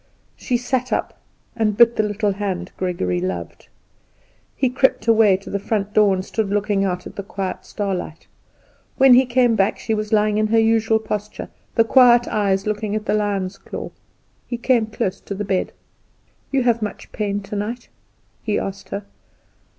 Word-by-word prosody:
She 245 - -1
sat 250 +1 -2
up, - - -2 0.3
and 215 -3 0
bit 235 0 +6
the - - +2
little 210 0 0
hand 190 -3 -4
Gregory 130 - -1
loved. 90 -2 -5 0.9
He 265 - +1
crept 255 -3 +1
away 220 -4 +5
to 195 - -11
the 200 - -1
front 205 0 -2
door, 210 -3 +4
and 185 0 -4
stood 220 -1 -2
looking 205 -1 0
out 180 -2 -2
at - - -10
the - - -2
quiet 190 -1 -5
starlight. 185 -6 -4 0.7
When 265 -2 +7
he 255 +1 +5
came 245 -1 +3
back 195 -1 +1
she 225 - -2
was 215 -1 -3
lying 210 -1 +2
in 215 - +2
her 225 +1 +2
usual 225 0 +3
posture, 210 -1 -5 0.3
the 230 - +5
quiet 240 0 +5
eyes 195 -2 0
looking 210 0 -2
at 215 0 -3
the - - 0
lion's 200 -2 -1
claw. - - -7 0.6
He 240 - -3
came 235 -2 +2
close 195 -3 -3
to 200 - -6
the 205 +2 -4
bed. 190 -1 -1 0.8
"You 270 -2 +2
have 235 -2 +2
much 210 - -6
pain 205 -1 -2
tonight?" 210 +4 -5 0.5
he 210 -2 -1
asked 195 0 -5
her. 200 0 -5
210 Hz, 175 wpm, -21 LUFS, 195-225 Hz, 0.9 s, When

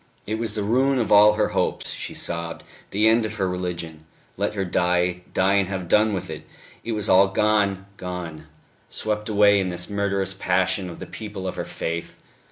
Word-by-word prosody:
It 110 +1 -3
was 115 -2 -2
the 105 - -1
ruin 130 +6 +2
of 115 -5 -1
all 105 +1 +8
her 105 0 +1
hopes, - - -1
she - - -6
sobbed, 85 -1 -3 0.3
the 105 +2 +2
end 115 +1 +4
of 110 0 -4
her 95 -4 0
religion. 85 -3 -4 0.3
Let 100 +2 -1
her 95 -1 -1
die, 90 0 +1
die 95 +1 +2
and 100 -2 +3
have 95 -3 -4
done 105 +5 +4
with 95 -3 -4
it! - - -7 0.4
It 115 - -3
was 105 -2 -2
all 95 +1 +6
gone, 100 -1 +1
gone, 85 -4 -6 0.4
swept 105 0 -3
away 100 -1 +5
in 95 -1 -1
this 90 +2 -6
murderous 100 -1 0
passion 95 0 0
of 85 - -9
the - - -7
people 105 -4 -7
of 90 - -2
her - - -4
faith 85 +1 -5
95 Hz, 195 wpm, -24 LUFS, 90-105 Hz, 0.4 s, all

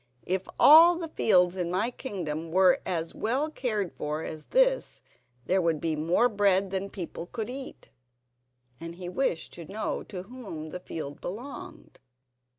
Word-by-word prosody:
If 185 +1 -2
all 330 +4 +9
the 335 -1 -5
fields 180 - +3
in 175 -2 -1
my 195 +7 0
kingdom 165 - -5
were 185 0 +4
as 165 -3 -2
well 270 +8 -1
cared 215 - -2
for 150 +2 -3
as 155 -1 -7
this, - - +2 0.4
there 190 +7 +2
would 165 -3 +1
be 160 -1 -1
more 170 +10 +3
bread 200 -3 +2
than 190 0 -1
my - - -9
people 175 -3 -7
could 230 +3 -5
eat." 265 +1 -9 0.9
And 165 0 -7
he 180 0 -7
wished 180 -5 -1
to 170 - -9
know 215 +2 -2
to 185 -3 -7
whom 200 -8 -8
the 180 - -5
field 150 -5 -7
belonged. 245 +10 -8
190 Hz, 160 wpm, -28 LUFS, 170-240 Hz, 0.9 s, all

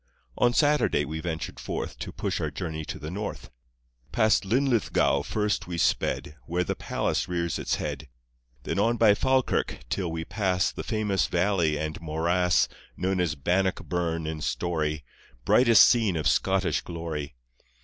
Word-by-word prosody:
On 120 - +3
Saturday 145 - +2
we 80 +3 -5
ventured 80 -1 -4
forth - - -5
To - - -5
push - - -3
our - - -1
journey 80 -3 -5
to - - -5
the 75 +3 -7
North. 105 +3 -5 0.6
Past 110 -2 +3
Linlithgow 120 +1 +2
first 105 -3 -1
we 85 -1 -4
sped, 75 -1 0
Where 90 +2 0
the - - -2
Palace - - -1
rears 85 -2 -2
its - - 0
head, 75 - -5 0.5
Then - - -2
on 115 +3 +2
by 110 -3 +6
Falkirk, 130 +4 0
till 90 -4 -1
we 80 0 -4
pass 95 -3 0
The - - -6
famous 105 -4 0
valley 85 -4 +1
and 80 +1 -4
morass 85 +2 +2 0.3
Known 95 +1 0
as 85 -4 0
Bannockburn 85 0 -1
in 80 0 -4
story, 75 -3 -1 0.4
Brightest 115 -4 +7
scene 110 -7 +3
of 80 - 0
Scottish 95 -1 +1
glory. 80 -4 -5
90 Hz, 150 wpm, -27 LUFS, 80-105 Hz, 0.6 s, Brightest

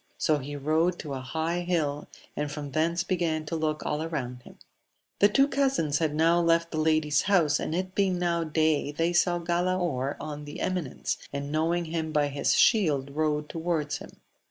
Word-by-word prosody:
' - - -40
So 155 -2 +2
he 145 +2 -6
rode 160 +5 +1
to 145 -3 -6
a 135 - -3
high 160 +6 -2
hill, 160 -5 -1 0.3
and 150 0 -2
from 145 -1 -6
thence 170 +3 +1
began 165 -4 -1
to 160 - -3
look 155 -1 -2
all 150 +1 -1
round 125 -6 -4
himu - - -15 0.6
The 205 - +6
two 275 +6 +4
cousins 265 - +1
had 155 -2 0
now 165 +2 +4
left 170 0 +2
the 155 - -2
lady's 155 -2 +2
house, 165 -7 +3
and 160 - -2
it 185 +1 -3
being 190 -2 +1
now 170 -1 0
day 155 -2 +1
they 165 +3 0
saw 175 0 +3
Galaor 170 -5 -1
on 150 -1 -6
the 145 - -8
eminence, 180 -8 -2
and 140 0 -4
knowing 165 +3 +1
him 160 -1 -3
by 150 -2 +2
his 140 0 +1
shield 150 - +3
rode 150 -1 0
towards 160 -3 -2
him. - - -12
160 Hz, 190 wpm, -27 LUFS, 150-175 Hz, 0.6 s, The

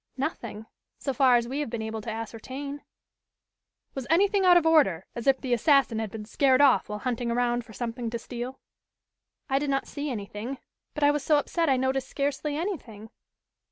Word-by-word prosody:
"Nothing, 235 -6 -4 0.3
so 275 - -3
far 260 -2 +5
as 235 -1 +2
we 270 +4 -3
have 295 - -2
been 225 -1 -4
able 220 0 -4
to 230 - -6
ascertain." 260 +6 -6 1.1
"Was 265 -3 -5
anything 390 +4 +3
out 355 -1 +8
of 340 - +2
order, 240 - +4
as 235 +1 -6
if 270 -1 +4
the 255 -2 -1
assassin 260 -2 +3
had 220 -1 -3
been 210 +1 -7
scared 260 +4 +3
off 280 -6 +4
while 210 - -3
hunting 240 0 -2
around 240 0 +1
for 225 -1 -14
something 235 +3 -4
to 235 - -3
steal?" 245 +2 -6 0.9
"I 270 0 +2
did 290 0 -2
not 270 -1 0
see 290 0 -5
anything. 220 +2 -5 0.4
But 300 - -2
I 290 - +6
was 295 0 -1
so 300 +1 +4
upset 330 +2 0
I 265 - +4
noticed 265 +1 0
scarcely 285 +1 -2
anything." 245 - -5
260 Hz, 195 wpm, -27 LUFS, 230-285 Hz, 1.1 s, out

